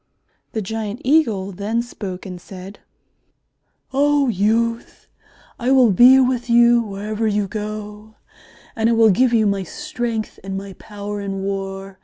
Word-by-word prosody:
The 220 - -2
giant 220 +2 -4
Eagle 230 -10 +2
then 210 +5 -2
spoke 195 -6 -7
and 180 -2 -8
said, 190 +2 -11 1.1
"Oh, 285 0 +3
youth, 230 +3 -1 0.5
I 245 0 -1
will 260 -4 +5
be 250 +7 +7
with 250 -2 0
you 235 0 +5
wherever 215 +1 -3
you 205 -1 0
go, 210 +1 -7 0.6
and 225 0 +1
I - - +3
will 225 -1 +5
give 250 +6 +3
you 225 -2 +3
my 200 -1 +1
strength 225 +4 -4
and 195 0 -4
my 195 0 -7
power 205 0 -6
in 195 -1 -4
war. 195 0 -5
215 Hz, 145 wpm, -20 LUFS, 195-235 Hz, 1.1 s, be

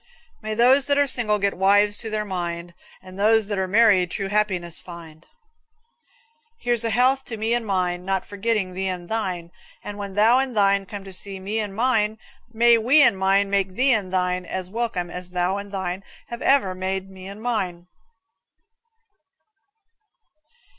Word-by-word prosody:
May 215 0 -4
those 260 +4 +4
that 285 -1 +2
are 285 - +4
single 230 -6 +1
get 200 -1 0
wives 205 +2 +3
to 225 - -3
their 215 0 -2
mind, 175 -2 -4 0.3
And 185 +1 -12
those 215 0 +3
that 205 -2 -2
are 190 - -1
married 200 -3 +4
true 195 +1 -4
happiness 190 -5 -1
find. 165 -3 -12 1.3
Here's 240 -1 0
a 230 - 0
health 255 +4 +2
to 225 - -5
me 220 +2 -1
and 240 -2 -1
mine, 180 -2 -1
Not 190 0 -1
forgetting 205 -2 -2
thee 190 +1 -3
and 180 -2 -5
thine; 185 -6 -3 0.3
And 205 0 -7
when 200 -1 -6
thou 225 +5 +5
and 260 -4 -2
thine 200 -1 +3
Come 205 0 -7
to 195 -1 -7
see 195 +1 -4
me 205 +4 -3
and 205 -3 -4
mine, 220 -2 +1 0.3
May 235 0 +4
we 270 +7 +5
and 195 - +4
mine 195 +1 +1
make 195 -2 0
thee 260 +2 +3
and 200 -5 -1
thine 180 -1 0
As 185 +1 -5
welcome 210 -6 -3
as 180 0 -7
thou 180 +2 -1
and 200 0 -7
thine 190 -1 -4 0.3
Have 235 0 -7
ever 265 -9 +3
made 190 +1 -3
me 190 -1 -11
and 200 +2 -9
mine. 190 -7 -3
200 Hz, 175 wpm, -23 LUFS, 185-225 Hz, 1.3 s, thou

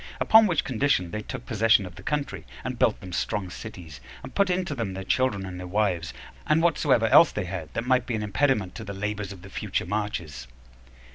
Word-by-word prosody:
Upon 220 0 +6
which 170 -5 +1
condition 115 -9 +1
they 105 - -3
took 115 - -7
possession 110 -3 +3
of 90 - -9
the - - -12
country, 145 -1 -3 0.2
and 125 -2 -4
built 110 - +3
them 90 -3 -9
strong 95 +1 -2
cities, 85 -8 -9 0.2
and - - -9
put 200 -1 +2
into 180 -3 0
them 115 -8 -3
their 95 - -5
children 105 -2 0
and 90 -1 -7
their 90 - -6
wives, 90 -4 0 0.4
and 155 +2 +3
whatsoever 145 -8 +3
else 165 - +7
they 105 - -3
had 85 -4 -6
that 115 - -2
might 125 -1 +2
be 120 - -1
an 105 - -2
impediment 105 -3 +1
to 115 - -7
the 100 -2 -6
labors 105 0 -3
of 95 -3 -11
their 95 - -12
future - - -2
marches. 85 - -4
105 Hz, 215 wpm, -26 LUFS, 95-130 Hz, 0.4 s, else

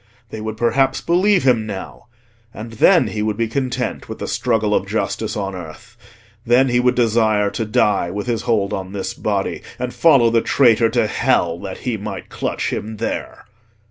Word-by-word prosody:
They 110 - -6
would 110 0 -5
perhaps 135 +3 +1
believe 185 +2 +2
him 120 -5 +2
now, 100 +2 -8 0.5
and 115 +2 -8
then 175 - +4
he 105 - -3
would 105 -1 -1
be 115 -1 0
content 125 -1 -3
with - - -6
the - - -5
struggle 110 -3 0
of - - 0
justice - - -2
on 100 -1 -3
earth—then 115 +8 -3
he 120 0 +2
would 125 0 +2
desire 110 -3 +2
to 115 - -3
die 105 -4 +1
with 100 +3 -4
his 115 -3 -1
hold 105 -4 0
on 95 -1 -5
this 100 -2 -4
body, - - -2 0.2
and 125 0 -4
follow 135 -8 +4
the 115 0 +3
traitor 115 -4 +3
to 115 0 +1
hell 85 -4 +1
that 95 -1 -7
he 120 -3 -1
might 100 -2 -7
clutch - - -3
him 110 +1 -5
there. 115 - -5
110 Hz, 180 wpm, -19 LUFS, 105-125 Hz, 0.5 s, then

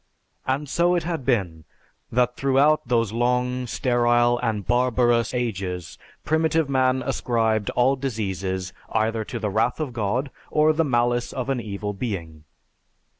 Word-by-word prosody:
And 135 +3 -1
so 175 +5 +2
it 175 - 0
had 165 -4 -3
been 95 -11 0 0.5
that 125 +1 +2
throughout 140 +2 +3
those 115 -3 +1
long, 125 +1 0
sterile, 120 0 +2
and 105 -4 -2
barbarous 120 -2 +2
ages 100 -8 -3 0.3
primitive 160 0 +2
man 130 -1 +2
ascribed 110 -3 0
all 130 +2 +3
diseases 95 -7 -3 0.2
either 110 0 0
to 120 - -6
the 105 -3 -2
wrath 110 +7 +1
of 145 -5 -3
God, 120 +5 -1 0.2
or 155 +1 +3
the 165 +1 +2
malice 120 -3 +1
of 130 0 -4
an 130 - -1
Evil 105 -1 -4
Being. 85 -8 -5
120 Hz, 140 wpm, -24 LUFS, 110-130 Hz, 0.5 s, throughout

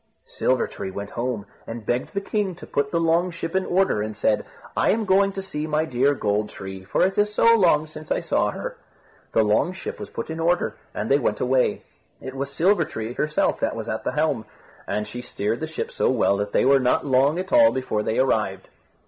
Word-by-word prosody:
Silver 130 -1 +1
tree - - -6
went 100 +1 -6
home, 120 -4 -3 0.2
and 115 -1 -7
begged 120 - -2
the 200 - 0
king 200 -2 -1
to - - -11
put 140 0 -1
the 170 - 0
long 165 +2 +2
ship 170 0 -5
in 190 - +1
order, 185 - +2
and 105 0 -4
said, 105 0 +1 0.3
"I - - +2
am 220 0 +2
going 195 +1 +4
to 195 - -5
see 155 -5 -4
my 155 +1 +1
dear 140 0 +2
Gold 105 -2 0
tree, 95 -1 -8
for 95 - +1
it 190 +2 +1
is 210 0 +2
so 230 +2 +5
long 165 -7 +4
since 155 0 -11
I - - +2
saw - - +1
her." - - -6 0.6
The 110 - +4
long 105 - +2
ship 185 - -7
was 205 - -7
put - - -5
in 160 - -5
order, 175 +2 +1 0.2
and - - -2
they 140 - +5
went 105 -5 0
away. 130 0 +1 0.4
It 130 - -7
was 140 +1 -4
Silver 180 +4 +3
tree 110 -5 -5
herself 150 +3 0
that - - -1
was - - -5
at - - -3
the - - -2
helm, 145 -7 0 0.4
and 105 0 -2
she 125 - -6
steered 115 -2 -2
the 160 - -3
ship 160 - -4
so - - +1
well 120 -5 +3
that 100 0 -2
they - - +2
were 135 +1 +6
not 125 +2 +1
long 140 +3 +3
at 185 +1 -4
all 290 -1 +7
before 130 -5 -1
they 110 - -1
arrived. 105 -7 0
140 Hz, 230 wpm, -24 LUFS, 110-175 Hz, 0.6 s, all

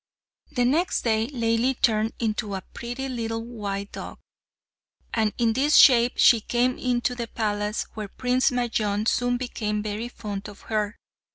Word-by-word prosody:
The 245 - +2
next 320 +9 +1
day 220 -1 +1
Laili 240 0 0
turned 220 0 +2
into 215 -3 -2
a 190 - -5
pretty 245 +3 -5
little 225 -3 -3 0.4
dog; - - -9 1.0
and 220 -2 +1
in 230 -2 +2
this 280 +5 +2
shape 245 -2 +7
she 230 -3 +6
came 245 +3 0
into 250 0 0
the 240 -2 -4
palace, 210 -2 -2
where 215 -2 -5
Prince 250 +5 +1
Majnun 220 -4 -1
soon 245 +1 +1
became 210 -4 -3
very 215 +2 -3
fond 210 -4 -6
of 205 - -13
her. 210 -1 -2
230 Hz, 150 wpm, -25 LUFS, 215-245 Hz, 1.0 s, shape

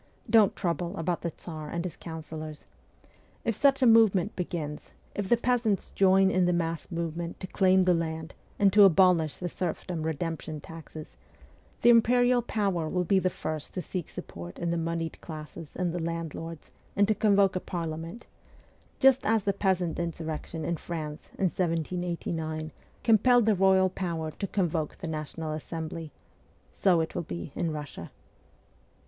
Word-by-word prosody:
'Don't 220 -3 +5
trouble 175 +1 -2
about 170 +1 -1
the 170 - -1
Tsar 155 -2 -8
and 170 +2 -3
his 180 - -4
counsellors. 155 -2 -7 0.8
If 230 - +2
such 275 +1 +3
a - - +6
movement 220 -5 +5
begins, 160 -4 -5 0.2
if 200 -2 -3
the 240 - +5
peasants 235 -4 0
join 190 0 +4
in 185 -1 +3
the 180 - +2
mass 165 -1 -2
movement 170 0 -4
to - - -5
claim 185 0 +3
the 180 -1 +4
land 160 -1 -3 0.2
and 195 -2 +4
to 210 - +7
abolish 180 -4 +5
the 180 - -3
serfdom 175 -1 -3
redemption 160 0 -3
taxes, 155 0 -10 0.7
the 240 - +8
imperial 245 +1 +5
power 195 -8 -1
will 180 +1 0
be 190 +2 +3
the 185 - +1
first 155 -3 -5
to 180 - -1
seek 180 -4 -4
support 85 +1 -8
in 170 -1 -1
the - - 0
moneyed 165 0 -3
classes 155 0 -9
and 180 -2 -1
the 175 - -2
landlords 165 -1 -5 0.2
and 200 0 +4
to 215 - +3
convoke 200 -3 +3
a - - +1
Parliament 165 +4 -5 0.7
just 270 -1 +5
as 220 -1 +2
the 200 - +1
peasant 185 -4 0
insurrection 160 -1 -4
in 170 +1 -1
France 155 -2 -6
in - - -2
1789 165 -2 -2 0.3
compelled 235 +1 +5
the 220 - +4
royal 190 0 +4
power 165 -4 -3
to 195 - -4
convoke 165 -6 -1
the 175 - -6
National 155 0 -4
Assembly; 160 0 -5 0.6
so 180 -4 +3
it 160 - -3
will 175 - -2
be 85 - -6
in 170 - -1
Russia.' 150 -2 -7
170 Hz, 160 wpm, -28 LUFS, 160-195 Hz, 0.8 s, the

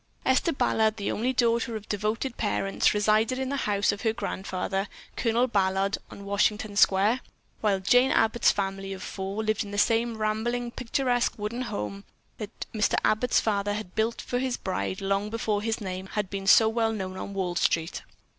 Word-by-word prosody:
Esther 265 +6 +3
Ballard, 220 -6 +1
the 200 - -2
only 240 +4 0
daughter 235 -2 +1
of 215 -1 -7
devoted 215 +5 -2
parents, 195 -2 +1
resided 215 +4 +2
in 265 0 -2
the 280 - -1
house 200 0 +2
of 205 - -6
her 220 -2 +1
grandfather, 195 -3 -3 0.3
Colonel 235 +1 +2
Ballard, 195 -3 +1
on 200 - -10
Washington 205 +1 0
Square, 200 +5 +4 0.4
while 205 -3 +1
Jane 245 +7 +4
Abbott's 225 +1 +3
family 195 0 -2
of 190 - -8
four 195 +3 -4
lived 215 -1 0
in 205 - -9
the 205 - -5
same 230 +2 +2
rambling, 230 +3 -1
picturesque 245 0 0
wooden 215 +4 -3
house 105 - -4 0.4
that 210 0 -6
Mr. 215 -1 +2
Abbott's 225 +3 +3
father 205 -1 0
had 205 -4 -6
built 225 +1 0
for 245 - -2
his 255 -1 -1
bride 190 +1 -3
long 195 +1 0
before 215 -2 -1
his 225 +1 -1
name 190 -2 -5
had 205 -1 -3
become 195 -1 -4
so 220 +3 +7
well 225 0 +1
known 190 -4 -4
on 200 +1 -6
Wall 185 -2 -1
Street. 170 0 0
215 Hz, 180 wpm, -27 LUFS, 195-230 Hz, 0.4 s, so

